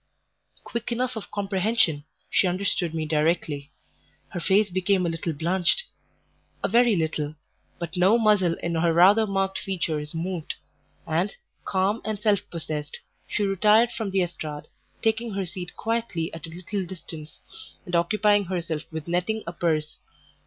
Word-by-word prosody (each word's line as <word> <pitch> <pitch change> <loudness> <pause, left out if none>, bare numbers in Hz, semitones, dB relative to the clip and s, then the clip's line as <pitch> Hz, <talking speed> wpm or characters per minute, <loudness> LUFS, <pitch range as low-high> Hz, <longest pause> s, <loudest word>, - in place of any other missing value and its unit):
Quick 235 +1 -4
enough 250 +1 -1
of 220 - -6
comprehension, 195 -6 +1 0.2
she - - +3
understood 180 -2 0
me 160 -1 -1
directly; 150 -2 0 0.6
her 175 - -4
face 195 +3 +3
became 185 0 +2
a - - +1
little 165 0 -2
blanched 175 - +2 0.8
a - - +3
very 235 +1 +4
little 155 -3 -1 0.4
but 170 +2 -5
no 185 +5 +5
muscle 205 -7 +3
in 170 - -1
her 165 +1 +2
rather 200 +6 +6
marked 195 -1 0
features 160 -5 -2
moved; 170 -1 -3 0.5
and, 170 +6 0 0.3
calm 195 +3 +1
and 215 -1 -2
self 205 -1 +3
possessed, 155 -3 -4 0.3
she 210 - -1
retired 210 +4 +4
from 220 -3 -3
the 190 -1 +2
estrade, 155 -4 -6 0.3
taking 225 0 +1
her 195 -1 -1
seat 180 0 -6
quietly 225 -7 -2
at 165 -1 -7
a - - -9
little 180 +4 -4
distance, 165 -4 -9 0.5
and 180 - -8
occupying 205 +4 +3
herself 170 -4 -2
with 160 -1 -5
netting 180 +6 0
a 170 - -5
purse. 155 -3 -1
180 Hz, 150 wpm, -26 LUFS, 165-205 Hz, 0.8 s, rather